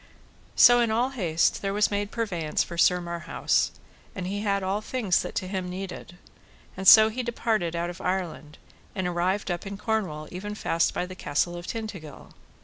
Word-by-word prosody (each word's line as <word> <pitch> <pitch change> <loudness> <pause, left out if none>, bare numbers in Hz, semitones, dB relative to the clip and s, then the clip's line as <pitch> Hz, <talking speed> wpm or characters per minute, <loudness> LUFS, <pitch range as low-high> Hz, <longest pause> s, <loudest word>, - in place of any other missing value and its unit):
So 245 0 +7
in 235 -1 +2
all 235 +4 +1
haste 170 -10 +1
there 195 0 -2
was 210 0 +2
made 205 0 -1
purveyance 180 -10 -1
for 170 - -8
Sir 180 +1 +4
Marhaus, 170 -1 -1 0.5
and 185 - -4
he 200 +2 -3
had 200 -2 0
all 195 +3 -1
things 215 -6 0
that - - -7
to 185 - -2
him 185 -1 -3
needed; 180 -1 -7 0.6
and 190 0 -3
so 220 +2 +10
he 240 +4 -3
departed 220 -7 -1
out 170 +1 -2
of 175 - -11
Ireland, 180 -5 -3 0.4
and 190 - -2
arrived 180 +3 -1
up 175 - -3
in 200 0 -6
Cornwall 195 -9 -2
even 205 +3 -6
fast 165 -5 0
by 180 - -1
the 185 - -9
Castle 175 0 -1
of 175 0 -8
Tintagil. 200 -10 -7
190 Hz, 185 wpm, -26 LUFS, 175-210 Hz, 0.6 s, so